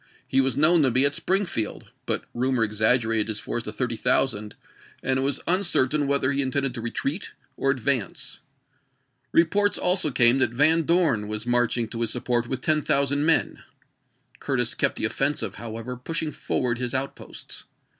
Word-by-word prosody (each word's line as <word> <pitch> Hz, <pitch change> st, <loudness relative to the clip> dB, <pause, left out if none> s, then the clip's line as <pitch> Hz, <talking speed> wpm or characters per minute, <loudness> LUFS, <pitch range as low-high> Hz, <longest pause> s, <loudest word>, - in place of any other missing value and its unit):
He 135 Hz, -, +2 dB
was 135 Hz, 0 st, -1 dB
known 160 Hz, +3 st, +5 dB
to 135 Hz, -, +4 dB
be 130 Hz, +3 st, +4 dB
at 140 Hz, -, +2 dB
Springfield; 180 Hz, -, -1 dB, 0.2 s
but -, -, 0 dB
rumor 125 Hz, -1 st, 0 dB
exaggerated 110 Hz, +1 st, +2 dB
his 110 Hz, -1 st, -2 dB
force 120 Hz, -, -4 dB
to 105 Hz, -, -7 dB
thirty 115 Hz, +2 st, -2 dB
thousand, 110 Hz, -3 st, 0 dB, 0.5 s
and 130 Hz, 0 st, 0 dB
it -, -, 0 dB
was 140 Hz, 0 st, -1 dB
uncertain 155 Hz, -6 st, +1 dB
whether 140 Hz, -1 st, +1 dB
he 140 Hz, 0 st, +1 dB
intended 135 Hz, -1 st, -1 dB
to 120 Hz, -, -5 dB
retreat 140 Hz, -, -3 dB, 0.2 s
or 135 Hz, -, -1 dB
advance. 130 Hz, -4 st, -1 dB, 0.9 s
Re 165 Hz, -, +5 dB
ports 205 Hz, +5 st, +1 dB
also 180 Hz, -3 st, +3 dB
came 125 Hz, 0 st, +4 dB
that 130 Hz, -, +3 dB
Van 155 Hz, +5 st, +3 dB
Dorn 160 Hz, -, +2 dB
was 105 Hz, +1 st, -4 dB
marching 120 Hz, -1 st, +1 dB
to 115 Hz, 0 st, -5 dB
his 115 Hz, -, 0 dB
support 120 Hz, 0 st, -1 dB
with 130 Hz, +1 st, -4 dB
ten 155 Hz, -1 st, +2 dB
thousand 145 Hz, +1 st, +1 dB
men. 165 Hz, -, +2 dB, 0.8 s
Curtis -, -, 0 dB
kept -, -, 0 dB
the -, -, -2 dB
offensive, 135 Hz, -7 st, 0 dB
however, 115 Hz, +2 st, -6 dB
pushing 155 Hz, +5 st, -3 dB
forward 120 Hz, -4 st, -2 dB
his 125 Hz, +1 st, -3 dB
out 135 Hz, +1 st, -2 dB
posts. -, -, -8 dB
130 Hz, 175 wpm, -24 LUFS, 120-145 Hz, 0.9 s, known